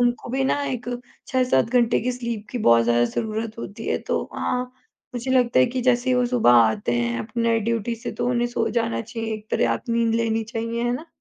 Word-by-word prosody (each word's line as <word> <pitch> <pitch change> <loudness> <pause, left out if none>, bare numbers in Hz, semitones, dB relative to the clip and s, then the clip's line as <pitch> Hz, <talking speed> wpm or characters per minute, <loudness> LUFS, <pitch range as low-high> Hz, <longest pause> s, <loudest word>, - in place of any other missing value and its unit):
उनको 240 0 0
भी 265 +1 0
ना 285 +2 +1
एक 245 -3 -4 0.4
6-7 255 - +2
घंटे 240 -1 +3
की 250 +2 -1
स्लीप 235 -4 -5
की 250 - -3
बहुत 115 - +5
ज़्यादा 120 0 +3
ज़रूरत 220 - -3
होती 225 0 -7
है - - +1
तो - - +1
हाँ, 250 0 -1 0.5
मुझे 245 +2 -3
लगता 250 - +3
है 130 - +5
कि 255 0 -3
जैसे 250 +1 +2
ही - - +4
वो 250 - +3
सुबह 240 - +4
आते 110 -1 +3
हैं 115 0 -1
अपने 115 - -3
नाइट 230 -1 +2
ड्यूटी 230 0 -1
से 230 - -6
तो 240 - -2
उन्हें 240 -1 +1
सो 225 -2 -1
जाना 230 0 0
चाहिए 225 0 -5
एक 215 0 -9
तरह - - +2
आप - - -5
नींद 230 -1 +1
लेनी 225 -1 0
चाहिए, 230 +1 -3
है 240 - +1
ना? 285 +7 -5
230 Hz, 230 wpm, -23 LUFS, 220-245 Hz, 0.5 s, बहुत